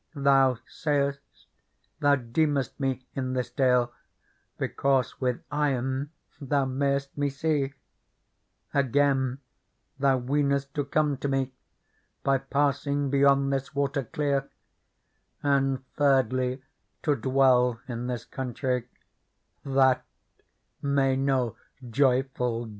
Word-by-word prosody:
Thou 135 Hz, -3 st, +4 dB
say'st, 140 Hz, -2 st, 0 dB, 0.8 s
thou 145 Hz, -2 st, +4 dB
deemest 140 Hz, +3 st, -1 dB
me 130 Hz, -2 st, -2 dB
in 130 Hz, -1 st, -2 dB
this 125 Hz, -2 st, -2 dB
dale 125 Hz, -2 st, +2 dB, 0.6 s
Because 135 Hz, -3 st, 0 dB
with 125 Hz, -2 st, -1 dB
eyen 135 Hz, -1 st, 0 dB, 0.3 s
thou 140 Hz, -1 st, +1 dB
may'st 140 Hz, +1 st, -1 dB
me 145 Hz, 0 st, 0 dB
see: 140 Hz, -1 st, -1 dB, 1.0 s
Again, 135 Hz, -1 st, +2 dB, 0.6 s
thou 135 Hz, -1 st, +3 dB
weenest 140 Hz, +1 st, 0 dB
to 145 Hz, -2 st, -1 dB
come 145 Hz, 0 st, +1 dB
to 140 Hz, -, -3 dB
me 135 Hz, -1 st, -1 dB, 0.7 s
By 135 Hz, -1 st, +3 dB
passing 140 Hz, 0 st, 0 dB
beyond 140 Hz, 0 st, +4 dB
this 135 Hz, +2 st, -3 dB
water 140 Hz, 0 st, 0 dB
clear: 140 Hz, +2 st, -1 dB, 0.9 s
And 135 Hz, -2 st, +1 dB
thirdly, 130 Hz, -2 st, +2 dB, 0.4 s
to 150 Hz, -, +3 dB
dwell 125 Hz, -1 st, +3 dB
in 120 Hz, -1 st, -4 dB
this 120 Hz, -2 st, -4 dB
countrie: 125 Hz, -1 st, -3 dB, 0.8 s
That 135 Hz, -2 st, +3 dB, 0.8 s
may 140 Hz, -2 st, +2 dB
no 130 Hz, -3 st, 0 dB, 0.3 s
joyful 125 Hz, -2 st, +1 dB
jeweller. -, -, -9 dB
135 Hz, 105 wpm, -27 LUFS, 130-140 Hz, 1.0 s, Thou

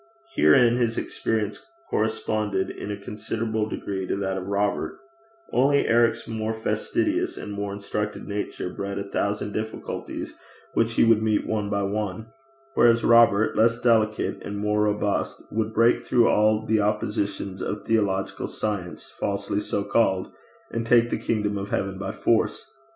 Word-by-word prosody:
Herein 115 Hz, -, +5 dB
his 115 Hz, -2 st, 0 dB
experience 105 Hz, -2 st, -2 dB, 0.2 s
corresponded 110 Hz, -2 st, -1 dB
in -, -, -7 dB
a 105 Hz, -, -3 dB
considerable 110 Hz, +1 st, -3 dB
degree 95 Hz, -3 st, -4 dB
to -, -, 0 dB
that 95 Hz, -1 st, -2 dB
of 95 Hz, 0 st, -5 dB
Robert; 100 Hz, +1 st, -1 dB, 0.6 s
only 140 Hz, +3 st, +3 dB
Eric's 115 Hz, 0 st, +3 dB
more 110 Hz, 0 st, -2 dB
fastidious 315 Hz, -, -1 dB
and 105 Hz, -, -6 dB
more 100 Hz, 0 st, -3 dB
instructed 105 Hz, +1 st, -4 dB
nature 100 Hz, -3 st, -4 dB
bred 100 Hz, 0 st, -4 dB
a 100 Hz, -, -2 dB
thousand 100 Hz, +1 st, -2 dB
difficulties 110 Hz, 0 st, -5 dB, 0.4 s
which 115 Hz, 0 st, +1 dB
he -, -, +4 dB
would 115 Hz, -1 st, +5 dB
meet 110 Hz, -1 st, +1 dB
one 105 Hz, -2 st, -1 dB
by 100 Hz, -1 st, 0 dB
one, 105 Hz, +1 st, -2 dB, 0.5 s
whereas 115 Hz, -1 st, +4 dB
Robert, 115 Hz, -3 st, +5 dB
less 115 Hz, +1 st, +4 dB
delicate 110 Hz, -3 st, +1 dB
and 100 Hz, 0 st, -5 dB
more 105 Hz, +1 st, +1 dB
robust, 105 Hz, -1 st, -1 dB
would 110 Hz, 0 st, -1 dB
break 115 Hz, +2 st, +3 dB
through 120 Hz, -1 st, +3 dB
all 110 Hz, +1 st, +3 dB
the 110 Hz, 0 st, +2 dB
oppositions 100 Hz, -2 st, -1 dB
of 105 Hz, -, -4 dB
theological 100 Hz, -4 st, 0 dB
science 100 Hz, -5 st, -4 dB
falsely 100 Hz, 0 st, -2 dB
so 100 Hz, -1 st, -2 dB
called, 100 Hz, -3 st, +1 dB, 0.4 s
and 115 Hz, -, -2 dB
take 120 Hz, 0 st, +4 dB
the -, -, 0 dB
kingdom 105 Hz, -2 st, -1 dB
of 100 Hz, +1 st, -5 dB
heaven 95 Hz, -1 st, -2 dB
by 100 Hz, -, -3 dB
force. -, -, 0 dB
105 Hz, 150 wpm, -25 LUFS, 100-115 Hz, 0.6 s, Herein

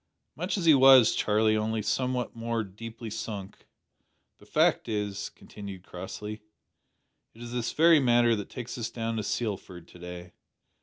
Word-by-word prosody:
"Much 180 Hz, +8 st, -2 dB
as 180 Hz, -, -2 dB
he 160 Hz, -, +8 dB
was, 130 Hz, -4 st, +7 dB
Charlie, 110 Hz, +1 st, +2 dB
only 110 Hz, 0 st, -1 dB
somewhat 125 Hz, +2 st, -1 dB
more 115 Hz, 0 st, -2 dB
deeply 110 Hz, +3 st, -9 dB
sunk. 100 Hz, -3 st, -7 dB, 0.7 s
The -, -, -18 dB
fact -, -, +2 dB
is," 105 Hz, -2 st, -3 dB
continued 100 Hz, -3 st, -10 dB
Crossley, 105 Hz, +4 st, -7 dB, 0.9 s
"it 115 Hz, -, -14 dB
is 120 Hz, -, -8 dB
this 120 Hz, -1 st, -2 dB
very 165 Hz, 0 st, +6 dB
matter 120 Hz, -3 st, +4 dB
that 105 Hz, -2 st, -6 dB
takes 125 Hz, 0 st, -7 dB
us 115 Hz, -, -3 dB
down 115 Hz, -1 st, -3 dB
to -, -, 0 dB
Sealford 100 Hz, -6 st, -4 dB
to 90 Hz, -, -15 dB
day. 90 Hz, 0 st, -9 dB
110 Hz, 155 wpm, -28 LUFS, 100-120 Hz, 0.9 s, he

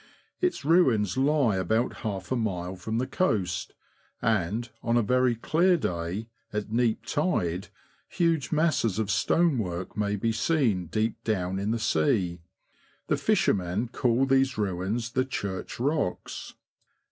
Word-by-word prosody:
Its 360 Hz, -, -1 dB
ruins 125 Hz, -, +3 dB
lie 135 Hz, -6 st, +2 dB
about 110 Hz, +7 st, 0 dB
half 100 Hz, -1 st, -5 dB
a -, -, +2 dB
mile 95 Hz, -6 st, -2 dB
from 110 Hz, +5 st, -3 dB
the 125 Hz, -, 0 dB
coast, 95 Hz, -, -1 dB, 0.4 s
and, 110 Hz, +2 st, 0 dB
on 115 Hz, 0 st, +1 dB
a 120 Hz, -, +3 dB
very 125 Hz, +2 st, +2 dB
clear 170 Hz, +10 st, +3 dB
day, 90 Hz, -, -3 dB, 0.2 s
at 105 Hz, 0 st, -3 dB
neap 115 Hz, -1 st, +1 dB
tide, 100 Hz, -, 0 dB, 0.4 s
huge 165 Hz, -5 st, +1 dB
masses 155 Hz, -, +2 dB
of 110 Hz, -2 st, 0 dB
stonework 100 Hz, -, +1 dB
may 105 Hz, 0 st, 0 dB
be 115 Hz, +3 st, 0 dB
seen 115 Hz, -, +1 dB
deep 110 Hz, +6 st, -1 dB
down 95 Hz, -3 st, -1 dB
in 100 Hz, +2 st, -1 dB
the 115 Hz, -, +1 dB
sea; 95 Hz, -, +1 dB, 0.7 s
the -, -, +3 dB
fishermen 95 Hz, +5 st, +1 dB
call 125 Hz, +1 st, +2 dB
these 135 Hz, 0 st, +2 dB
ruins 105 Hz, +4 st, -2 dB
the 130 Hz, -, +1 dB
Church 100 Hz, -8 st, -5 dB
Rocks. 140 Hz, -, -2 dB
110 Hz, 135 wpm, -27 LUFS, 95-130 Hz, 0.7 s, ruins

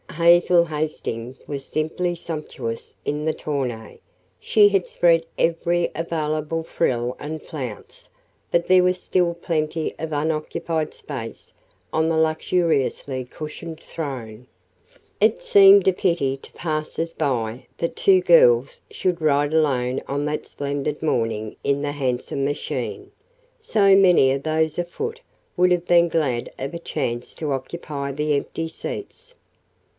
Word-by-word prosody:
Hazel 170 Hz, +1 st, +5 dB
Hastings 150 Hz, -6 st, -4 dB
was 140 Hz, -2 st, -4 dB
simply 165 Hz, +5 st, -2 dB
sumptuous 150 Hz, -9 st, -6 dB
in 150 Hz, +1 st, -2 dB
the 160 Hz, -, +1 dB
tonneau 125 Hz, -7 st, -4 dB, 0.4 s
she 210 Hz, -, +5 dB
had 195 Hz, -3 st, +1 dB
spread 165 Hz, -1 st, +3 dB
every 170 Hz, +1 st, +1 dB
available 160 Hz, -1 st, -2 dB
frill 125 Hz, -7 st, -1 dB
and 155 Hz, +1 st, -5 dB
flounce, 130 Hz, -10 st, -8 dB, 0.4 s
but 170 Hz, 0 st, +2 dB
there 185 Hz, 0 st, +6 dB
was 180 Hz, 0 st, +1 dB
still 175 Hz, -2 st, +1 dB
plenty 160 Hz, -1 st, -2 dB
of 160 Hz, 0 st, -4 dB
unoccupied 155 Hz, +1 st, -2 dB
space 120 Hz, -6 st, -8 dB, 0.4 s
on 160 Hz, +1 st, +2 dB
the 165 Hz, -, +1 dB
luxuriously 155 Hz, -5 st, 0 dB
cushioned 155 Hz, +4 st, -8 dB
"throne." 125 Hz, -6 st, -7 dB, 0.7 s
It 215 Hz, +2 st, +3 dB
seemed 195 Hz, -1 st, +7 dB
a 190 Hz, -, +5 dB
pity 170 Hz, -7 st, 0 dB
to -, -, -16 dB
passers 160 Hz, +1 st, -3 dB
by 120 Hz, -3 st, -2 dB
that 170 Hz, -, -2 dB
two 380 Hz, -2 st, +4 dB
girls 485 Hz, 0 st, +5 dB
should 180 Hz, -, -1 dB
ride 145 Hz, -1 st, +2 dB
alone 130 Hz, -5 st, +1 dB
on 145 Hz, +1 st, -2 dB
that 150 Hz, 0 st, -2 dB
splendid 145 Hz, +1 st, -3 dB
morning 115 Hz, -7 st, -1 dB
in 140 Hz, +1 st, 0 dB
the 145 Hz, -, -1 dB
handsome 135 Hz, -1 st, -2 dB
machine 145 Hz, +1 st, -3 dB, 0.5 s
so 205 Hz, -, +4 dB
many 180 Hz, -9 st, +6 dB
of 135 Hz, +1 st, -2 dB
those 160 Hz, 0 st, 0 dB
afoot 445 Hz, -, -4 dB, 0.3 s
would 180 Hz, 0 st, +3 dB
have 175 Hz, -1 st, +1 dB
been 170 Hz, 0 st, +5 dB
glad 140 Hz, -8 st, -1 dB
of 135 Hz, +4 st, -4 dB
a 170 Hz, -, -4 dB
chance 120 Hz, -7 st, -3 dB
to 155 Hz, -3 st, -3 dB
occupy 140 Hz, +1 st, -4 dB
the 150 Hz, +2 st, 0 dB
empty 165 Hz, +3 st, -3 dB
seats. 465 Hz, -, -7 dB
155 Hz, 135 wpm, -23 LUFS, 140-170 Hz, 0.7 s, seemed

